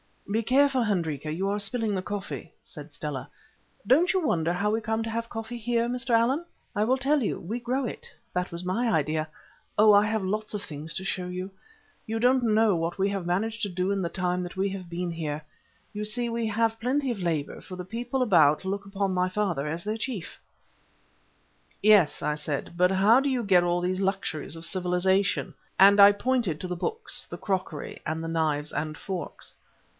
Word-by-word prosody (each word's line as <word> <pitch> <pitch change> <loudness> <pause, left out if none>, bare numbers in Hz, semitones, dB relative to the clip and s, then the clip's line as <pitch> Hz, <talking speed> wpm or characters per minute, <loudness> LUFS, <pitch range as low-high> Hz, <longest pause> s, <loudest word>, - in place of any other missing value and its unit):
"Be 220 +2 +2
careful, 265 +2 +3
Hendrika; 160 - -1
you 190 +5 -1
are 205 +1 0
spilling 215 +1 -1
the 190 - -1
coffee," 205 +1 -6
said - - -11
Stella. - - -5 0.6
"Don't 320 +8 +4
you 370 -4 +1
wonder 170 - +1
how 200 +4 0
we 220 - +1
come 220 0 -1
to 225 - -4
have 230 +1 -3
coffee 225 +1 -5
here, 235 0 0
Mr. 250 0 -3
Allan? 245 +8 +3 0.3
I 210 - +1
will 255 +3 +2
tell 280 +2 +2
you—we 215 0 -2
grow 255 +3 -1
it. - - -6 0.3
That 180 0 -1
was 170 +1 -5
my 225 +7 0
idea. 155 -2 0 0.5
Oh, 215 0 +7
I 205 +1 +6
have 215 -1 -1
lots 215 +3 -2
of 205 - -3
things 150 0 -6
to 190 - -2
show 185 -1 -2
you. 185 +2 -5 0.6
You 225 +1 -2
don't 250 +2 +3
know 220 -4 +3
what 165 +1 -2
we 195 +1 +2
have 195 -3 -3
managed 220 +6 -1
to 205 - 0
do 185 +1 -1
in 200 -1 0
the 170 - -1
time 180 +1 -1
that 175 +1 -7
we 195 +1 +1
have 190 -3 -7
been 175 0 -3
here. 155 -2 -4 0.5
You 210 -1 -4
see 235 +3 -1
we 230 -1 -1
have 225 +1 0
plenty 265 +2 0
of 225 - -4
labour, 165 -5 -2
for 185 - -9
the 180 0 -6
people 240 +5 -2
about 160 -9 +4
look 200 +1 -3
upon 195 -1 -1
my 180 0 +2
father 185 -7 -1
as 165 +3 -3
their 215 +2 -2
chief." 220 -6 -5 1.4
"Yes," 200 -8 +5
I 150 - 0
said, 150 +1 -4
"but 180 +1 +5
how 200 +6 +5
do 280 +1 0
you 255 -3 0
get 185 -4 +5
all 175 0 +1
these 185 +1 -1
luxuries 190 -6 -2
of 165 0 -6
civilization?" 185 +2 +1 0.2
and 200 +2 +7
I 200 0 +10
pointed 225 -8 0
to 185 - -3
the 180 0 -4
books, 450 +1 -2
the - - -6
crockery, 185 -6 -3
and 160 +1 -2
the - - -3
knives 155 -2 0
and 155 +1 -3
forks. 185 -3 -6
195 Hz, 205 wpm, -27 LUFS, 175-225 Hz, 1.4 s, I